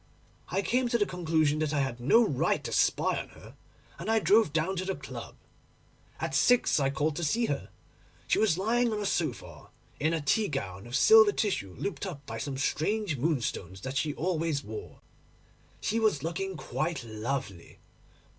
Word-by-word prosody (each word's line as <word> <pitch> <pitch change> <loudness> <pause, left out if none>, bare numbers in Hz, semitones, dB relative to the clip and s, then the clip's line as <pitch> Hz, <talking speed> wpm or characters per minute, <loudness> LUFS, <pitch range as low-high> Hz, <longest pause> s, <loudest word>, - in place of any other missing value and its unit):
I 195 - -1
came 250 +3 +1
to 235 - +2
the 205 - +2
conclusion 160 -5 +1
that 155 -1 0
I 140 - +2
had 135 -3 -3
no 225 - +5
right 135 - 0
to - - -5
spy - - +2
on - - -12
her, - - -14 0.4
and 180 - -5
I 225 - +4
drove 215 -4 +4
down 165 +5 0
to 185 - -2
the 190 0 -2
club. - - -8 0.8
At - - -3
six 245 -9 +4
I 135 -1 +2
called 145 +2 -1
to 175 - -2
see 230 +10 +1
her. - - -3 0.6
She - - +2
was 205 -7 +3
lying 235 +4 +1
on 215 - -2
a 205 - -3
sofa, - - -3 0.3
in 155 +2 +1
a - - -1
tea 205 +9 +1
gown 100 -7 -5
of 120 - -4
silver 220 +7 +7
tissue 185 - -2
looped 200 0 -3
up 145 -6 -8
by 140 - -6
some 140 -2 -4
strange 175 +5 0
moonstones 120 - -2
that 130 +4 -5
she 150 +1 0
always 165 -4 -1
wore. 425 - -8 0.8
She 225 +2 0
was 215 -11 +1
looking 175 +3 -3
quite 155 -2 -3
lovely. 110 -4 -5
160 Hz, 185 wpm, -29 LUFS, 140-205 Hz, 0.8 s, silver